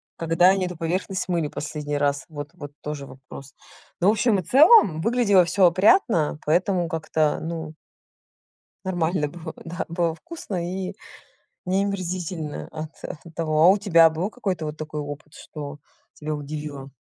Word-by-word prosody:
Когда 165 +2 +3
они 190 -1 +2
эту 180 -2 -6
поверхность 185 +4 -2
мыли 170 -4 0
последний 150 -1 -4
раз? 140 -1 0
Вот 145 -2 -7
вот 145 -5 -9
тоже 150 -2 -5
вопрос. 135 0 -12 0.5
Но 175 - +2
в - - +7
общем 215 -1 +2
и - - -4
целом 270 - +6
выглядело 215 -3 +4
всё 185 +3 +3
опрятно, 180 - +3
поэтому 175 +2 +2
как-то 160 -1 0
ну 160 -1 -5 1.1
нормально 175 -4 0
было 165 +2 -8
да, 170 +1 -4
было 170 -1 0
вкусно? 320 - -7
и 185 +2 -4 0.7
не 190 +2 +1
омерзительно 180 -5 -4
от 155 0 -6
от 165 0 -9
того. 155 -2 +1
А - - +9
у 195 +2 +5
тебя 170 -5 +6
был 170 +6 -2
какой-то 190 -9 -3
вот 150 0 -5
такой 155 0 -5
опыт, 145 +1 -8
что 145 -1 -8 0.4
тебя 155 0 -4
удивило? 145 -2 -6
165 Hz, 155 wpm, -24 LUFS, 150-185 Hz, 1.1 s, А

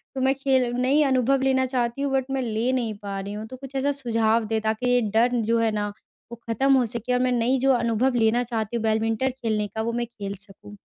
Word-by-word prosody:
तो 265 - -2
मैं 265 +1 +3
खेल 270 -2 +2
नई 260 +5 +2
अनुभव 265 0 +2
लेना 260 -1 +2
चाहती 245 0 -2
हूँ 280 - -1
बट 265 -1 +1
मैं 270 - 0
ले 230 +1 -1
नहीं 235 -4 -1
पा 200 -1 -4
रही 200 +1 -6
हूँ 215 +1 -6
तो 255 - -9
कुछ 270 +1 -11
ऐसा 275 +2 +1
सुझाव 230 -4 +1
दें 220 0 -1
ताकि 220 +3 -1
ये 245 - +4 0.2
डर 235 +2 +5 0.2
जो 230 - +3
है 225 -1 +2
ना 210 -1 -1 0.4
वो - - -5
ख़त्म 270 +5 +2
हो 255 -2 +4
सके 240 +2 -2
और 250 - +2
मैं 250 - +1
नई 245 +2 +1
जो 270 0 +3
अनुभव 240 +2 +1
लेना 235 +3 +2
चाहती 225 -2 -3
हूँ 225 - -4
बैडमिंटन 225 +3 +1
खेलने 220 -5 -2
का 220 +2 -5
वो 230 +1 -2
मैं - - -1
खेल 200 -4 -6
सकूँ। 205 +1 -14
240 Hz, 250 wpm, -24 LUFS, 220-260 Hz, 0.4 s, डर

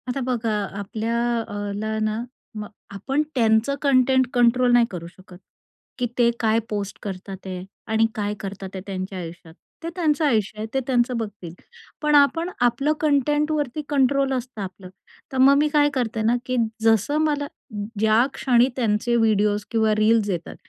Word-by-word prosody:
आता 260 +2 -2
बघा 230 -3 0 0.3
आपल्या 220 +3 -3 0.3
अ, - - -9 0.2
ला, 215 +1 -2
ना 215 +1 -1 0.4
मग 210 - -5 0.2
आपण 265 +9 -1
त्यांचं 225 +3 +3
कंटेंट 260 -2 +3
कंट्रोल 245 0 +4
नाही 240 -1 +6
करू 170 -2 -6
शकत, 180 +1 -15 0.6
की 250 - 0
ते 240 -1 +4
काय 220 0 +2
पोस्ट 205 -2 -4
करतात 190 -1 -6
आहे 185 -1 -5 0.3
आणि 220 0 +4
काय 205 -1 -2
करतात 195 -1 -6
ते 190 - -5
त्यांच्या 190 0 -4
आयुष्यात. 165 -1 -9 0.3
ते 335 - -3
त्यांचं 315 -3 +1
आयुष्य 215 -6 +1
आहे, 215 - -2
ते 270 - +2
त्यांचं 245 -1 +1
बघतील. 205 -7 -6 0.5
पण 300 -1 +2
आपण 290 +5 +4
आपलं 275 +5 +2
कंटेंटवरती 295 -1 +1
कंट्रोल 275 -1 +2
असतं 250 -3 -4
आपलं, 185 -1 -8 0.4
तर 265 - -4
मग 270 +2 +6
मी 300 +1 +3
काय 295 -1 +3
करते 235 -4 -1
ना, 230 +2 +3
की 255 0 -1 0.3
जसं 225 +6 +3
मला 295 -2 0 0.5
ज्याक्षणी 240 +3 +3
त्यांचे 235 -1 +1
व्हिडिओज 210 -2 +2
किंवा 220 -2 +2
रील्स 215 0 +3
येतात, 175 -3 -4
230 Hz, 160 wpm, -23 LUFS, 210-270 Hz, 0.6 s, नाही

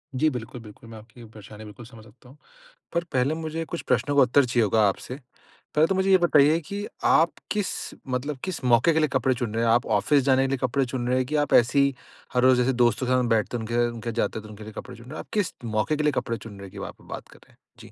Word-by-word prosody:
जी, 155 +4 +3
बिल्कुल-बिल्कुल। 115 -3 -9
मैं 110 - -10
आपकी 115 +3 -16
ये 115 - -11
परेशानी 105 0 -12
बिल्कुल 105 +3 -11
समझ 115 -2 -14
सकता 125 +3 -19
हूँ। 140 - -17 0.6
पर 170 0 0
पहले 130 +4 +1
मुझे 165 0 -4
कुछ 170 +1 -6
प्रश्नों 135 +3 +1
का 140 - +7
उत्तर 130 +2 +4
चाहिए 120 -1 +1
होगा 105 +1 +3
आपसे। 125 +6 -5 0.6
पहले 155 +2 +4
तो 195 - 0
मुझे 190 +1 +1
ये 190 - +7
बताइए 155 -2 +4
कि 200 +6 -6 0.2
आप 165 +1 +4 0.2
किस, 210 -2 0 0.4
मतलब 130 +3 -3
किस 185 -7 -4
मौके 125 +6 +4
के 160 - +2
लिए 155 - +3
कपड़े 130 0 +2
चुन 120 -4 -4
रहे 115 +1 0
हैं? 115 - +3
आप 120 +3 +3
ऑफिस 145 -3 +2
जाने 135 -1 +3
के - - +1
लिए 135 0 -1
कपड़े 130 +1 0
चुन 120 -1 -4
रहे 130 +1 +1
हैं 130 - +1
कि, 150 +4 -3
आप 145 -1 +1
ऐसी 125 +4 +4
ही 140 -1 +2 0.4
हर 125 - +2
रोज़ 130 -1 +5
जैसे 125 +1 +2
दोस्तों 120 +2 +1
के - - 0
साथ 130 - +3
हम 125 - 0
बैठते 115 +2 +1
हैं - - -5
उनके, 115 +2 -4
उनके 120 0 -6
साथ 115 - -5
जाते 110 -1 -1
हैं, 110 - -12
तो 105 - -12
उनके 105 0 -11
लिए 110 0 -10
कपड़े - - -9
चुन 115 - -14
रहे 130 - -10
हैं। - - -6
आप - - -9
किस 205 -6 0
मौके 110 +7 0
के 150 - -1
लिए 150 - +3
कपड़े 115 0 -4
चुन 110 +1 -11
रहे - - -12
हैं 95 - -15
कि, - - -13
वहाँ - - -6
पे - - -21
बात - - -8
कर - - -18
रहे - - -25
हैं? - - -28 0.2
जी। - - -13
125 Hz, 295 wpm, -25 LUFS, 115-150 Hz, 0.6 s, का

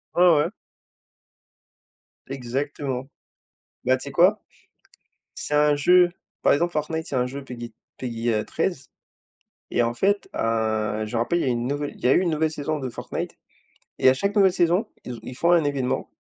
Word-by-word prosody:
Ouais, 175 - +3 0.2
ouais. 145 - +2 1.8
Exactement! 135 0 -3 0.8
Bah 130 +1 +3
tu - - -10
sais 140 - -6
quoi? 185 +8 +4 0.9
C'est 150 - -5
un 150 0 +4
jeu 180 +4 +5 0.3
par - - +5
exemple 170 +4 +1
Fortnite 160 +1 -2
c'est 135 - -4
un 125 - +2
jeu 135 +2 -6
PG 120 -2 -8 0.2
PG, 115 -2 -2
heu, 105 - 0
13 160 -5 -2 0.9
et 120 - +2
en 120 0 0
fait, 200 +9 +1
heu, 110 -1 0
je 105 - -9
me - - +2
rappelle, 145 +9 +1
il - - 0
y - - -1
a - - +1
une 120 -1 -1
nouvelle 145 +2 -2
il - - -17
y - - 0
a - - +6
eu - - +4
une 180 -2 +1
nouvelle 155 0 +1
saison 155 0 -3
de 130 -2 -4
Fortnite 120 - -5 0.6
et - - +5
à 130 - +6
chaque 200 +9 -1
nouvelle 190 -2 +5
saison, 180 +5 +2 0.2
ils 120 -2 -6
ils 125 +2 -8
font 170 +1 +3
un 165 -3 +5
événement 135 -3 -1
140 Hz, 190 wpm, -24 LUFS, 125-165 Hz, 1.8 s, a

